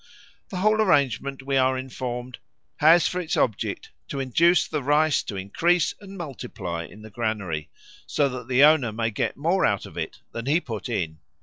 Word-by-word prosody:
The 195 - -5
whole 215 +3 +3
arrangement, 140 - +1
we 135 0 0
are 130 0 +3
informed, 125 -1 -5 0.4
has 160 +1 +6
for 180 - -2
its 160 - -2
object 110 -5 -1 0.2
to 140 - -4
induce 165 +7 +3
the 150 -2 -2
rice 150 +2 +3
to 105 - -5
increase 160 - +1
and 195 -1 -10
multiply 110 - -5
in 105 +7 -14
the 110 - -11
granary, 100 -9 -3 0.4
so 145 - +2
that 125 -2 -7
the 130 +2 +4
owner 150 -6 +5
may 115 +1 -1
get 105 - -2
more 170 +6 +1
out 100 - +1
of - - -12
it - - -5
than 115 +2 -6
he 155 +4 +3
put 115 -8 -6
in. 80 -9 -2
130 Hz, 185 wpm, -25 LUFS, 110-155 Hz, 0.4 s, has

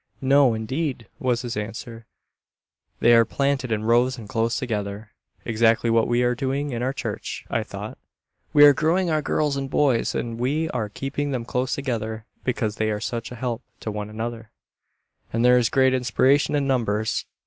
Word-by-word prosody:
"No, 135 -3 +5
indeed," 125 +1 -3
was 125 -2 0
his 120 -2 -4
answer, 115 +2 -6 0.9
"they 120 - +6
are 115 0 +7
planted 140 +1 -1
in 110 -1 0
rows, 120 +3 +3
and 110 -3 -9
close 115 -1 0
together." 105 -4 -4 0.3
Exactly 115 0 +2
what 115 -1 +3
we 120 +1 +2
are 125 0 +2
doing 135 +3 -2
in 120 -1 -3
our 130 +2 0
church, - - -5
I - - +1
thought. - - -8 0.5
We 145 -1 +8
are 145 - +8
growing 170 +4 +1
our 155 -1 +1
girls 150 -1 0
and 135 -1 -3
boys, 135 -4 +1
and 115 -1 -3
we 145 +6 0
are 105 -2 -2
keeping 135 +5 -3
them 125 -4 -3
close 125 +2 -1
together, 110 -5 -3 0.2
because 110 -4 -1
they 110 0 0
are 105 -1 -1
such 115 +2 -4
a - - -6
help 120 -1 -3 0.2
to 110 - -3
one 105 0 -5
another, 115 +1 -5 0.8
and 115 +2 +1
there 125 0 +6
is 115 - +1
great 130 -1 +3
inspiration 130 +3 +2
in 145 -1 +1
numbers. 110 -5 0
120 Hz, 180 wpm, -24 LUFS, 115-135 Hz, 0.9 s, We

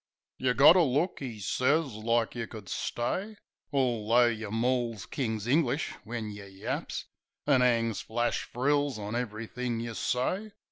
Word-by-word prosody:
"You 125 -1 +1
got 145 +5 +8
a - - +6
look," 155 +5 +1
'e 125 -5 -5
sez, 130 - +1
"like 115 +2 0
you 115 -2 -4
could 105 -5 -10
stay; 190 - -2 0.4
Altho' 120 -3 +3
yeh 110 -2 -4
mauls 115 -1 0
King's 110 -5 -3
English 140 +2 +1
when 110 -1 -4
yeh 100 -1 -9
yaps. 95 0 -4 0.4
An' 140 -3 +4
'angs 115 -3 +2
flash 120 +2 -1
frills 145 +1 +1
on 105 +1 -4
ev'rythink 115 +1 -3
yeh 115 -1 -5
say. 185 - -1
120 Hz, 145 wpm, -29 LUFS, 110-135 Hz, 0.4 s, got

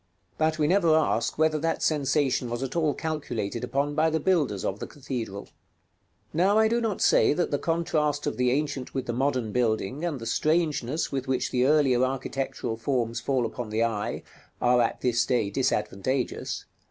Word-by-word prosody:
But 155 0 +2
we 155 - +2
never 170 -1 +4
ask 120 -7 +1
whether 155 0 +2
that 165 +2 -1
sensation 140 -4 +1
was 120 +2 -3
at 135 +2 -5
all 155 -4 +1
calculated 120 -9 -3
upon 140 +3 -1
by 160 +2 +3
the 160 0 0
builders 145 - +1
of 95 - -2
the - - -5
cathedral. 120 -8 -5
§ - - -18
LII. - - -26 0.8
Now 190 +6 +3
I 220 0 +5
do 235 +2 +1
not 220 -4 -2
say - - +5
that 175 +2 -1
the 145 - 0
contrast 155 -3 0
of 145 - -1
the 125 0 +2
ancient 135 -1 -2
with 130 - -2
the 120 - -2
modern 125 -3 0
building, 120 - 0
and 165 -6 -2
the 115 - -7
strangeness 155 +1 0
with 135 -1 -3
which 130 -1 0
the 125 +1 +2
earlier 135 -4 +4
architectural 130 -3 -2
forms 120 -1 -1
fall 130 -2 0
upon 115 0 -5
the 110 +2 +1
eye, 110 -3 -2 0.4
are 125 0 +4
at 115 - -1
this 120 -1 +2
day 110 -5 0
disadvantageous. 125 +1 -1
135 Hz, 190 wpm, -26 LUFS, 120-155 Hz, 0.8 s, I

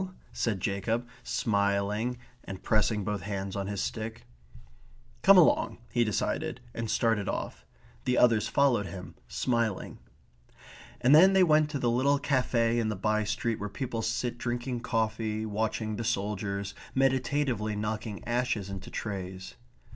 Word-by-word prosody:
said 110 -5 -1
Jacob, 110 +6 -1
smiling 100 +3 0 0.3
and 95 -1 -8
pressing 105 -1 +2
both 105 0 -2
hands 100 -1 -4
on 100 -1 -2
his 100 -1 -2
stick. 110 0 -5 1.0
"Come 195 0 +8
along," 175 - +4
he 120 - +3
decided; 110 +2 -1
and 115 -1 -4
started 110 -4 +1
off. - - -5 0.4
The 125 -1 +2
others 115 -3 +4
followed 125 -8 +2
him, 95 -2 -8
smiling. 115 -5 -1 1.0
And 125 +3 +5
then 185 +5 +8
they 190 -1 +6
went 155 -3 +4
to 145 - -2
the 120 -3 +1
little 135 +4 +3
cafe 125 -4 +1
in 110 -2 0
the 105 - -2
by 110 +2 +1
street 110 +2 -1
where 105 - -4
people 120 +1 -3
sit 115 +2 -2
drinking 120 +1 -2
coffee, 110 -2 -1
watching 110 0 -2
the 115 - -3
soldiers, 100 -2 -2 0.2
meditatively 130 -4 +1
knocking 105 0 -4
ashes 120 -5 -1
into 95 -2 -7
trays. 95 -2 -5
110 Hz, 140 wpm, -29 LUFS, 105-125 Hz, 1.0 s, Come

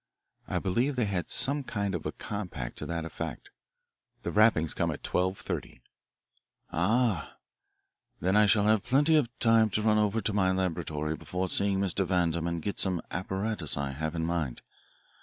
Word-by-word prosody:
I - - -1
believe 120 +9 0
they 125 -3 +1
had 95 -4 -2
some 140 +1 +3
kind 100 -5 -2
of 85 - -3
a - - -2
compact 90 - -6
to - - -5
that 85 -1 -3
effect. 80 - -6 0.7
The - - -2
rappings 105 -7 +4
come - - 0
at - - -5
twelve 95 +1 0
thirty." - - -6 0.9
"Ah, 105 +1 +1 0.8
then 95 +4 +1
I 105 0 +6
shall 105 0 +4
have 110 -1 +3
plenty 145 +5 +3
of 145 -7 +3
time 115 -1 +4
to 105 +1 -1
run 110 -1 +4
over 105 +1 +1
to 110 - -2
my 95 -2 +2
laboratory 80 -4 -2
before 90 +3 -3
seeing 100 +1 +1
Mr. 95 0 +1
Vandam 85 -3 0
and 85 -2 -3
get 100 - -3
some 95 -3 +1
apparatus 95 -2 -1
I 70 -1 -2
have 80 +4 -4
in 80 -1 -1
mind. 80 -7 -2
95 Hz, 175 wpm, -29 LUFS, 85-110 Hz, 0.9 s, I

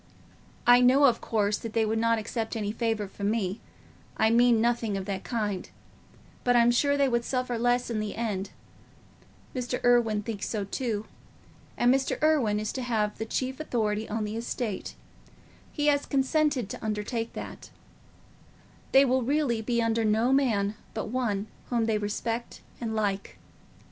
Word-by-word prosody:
I 245 0 +7
know, 260 +3 +5
of 240 -4 +3
course, 210 -2 0
that 225 -1 -7
they 225 -1 +2
would 220 +1 0
not 230 0 +2
accept 225 +1 -3
any 210 -2 -2
favour 225 -2 -1
from 200 +1 -3
me—I 220 +1 -3
mean 240 0 +5
nothing 230 -3 +1
of 190 - -4
that 195 -1 -4
kind—but 220 +2 -4
I'm 240 0 +5
sure 285 +4 +2
they 280 -1 +3
would 235 -2 +1
suffer 250 -1 -2
less 245 +1 +1
in 220 - -1
the 215 -1 -3
end. 205 -4 -2 1.1
Irwine 245 -3 +2
thinks 215 -3 -4
so 215 -3 -2
too. 215 +1 -3 0.7
And 245 +1 +4
Mr. 270 0 0
Irwine 265 -10 +3
is 215 0 -2
to 260 - -3
have 220 -4 -1
the 220 - -3
chief 260 +4 -2
authority 220 -7 -1
on 215 +1 -2
the 210 +1 -4
estate—he 235 - -6
has 285 -1 +2
consented 280 -3 +1
to - - -7
undertake 220 +2 -3
that. - - -8 1.2
They 270 +1 +7
will 260 0 +2
really 260 -3 +1
be 235 +1 0
under 230 0 +1
no 220 +4 +2
man 220 -7 +2 0.2
but 220 - -3
one 215 -5 -1 0.2
whom 235 -2 +1
they 220 -1 +1
respect 225 +3 -3 0.2
and 225 -2 -3
like. 200 -2 -2
230 Hz, 155 wpm, -28 LUFS, 215-245 Hz, 1.2 s, I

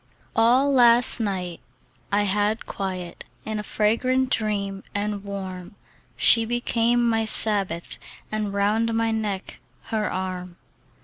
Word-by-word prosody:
ALL 255 +5 +3
last 240 -1 +5
night 185 -5 -3 0.5
I 205 +1 +2
had 205 +2 -1
quiet 185 -3 -6 0.2
In 215 -1 -3
a - - -2
fragrant 255 +5 0
dream 200 -3 -1
and 205 0 -3
warm: 190 -2 -7 0.4
She 230 - +6
became 240 0 0
my 225 -1 +1
Sabbath, 200 -6 +2 0.3
And 215 -1 -2
round 215 +3 0
my 225 0 0
neck, 210 -3 -4 0.3
her 215 -1 -1
arm. 185 -1 -5
210 Hz, 120 wpm, -23 LUFS, 195-230 Hz, 0.5 s, She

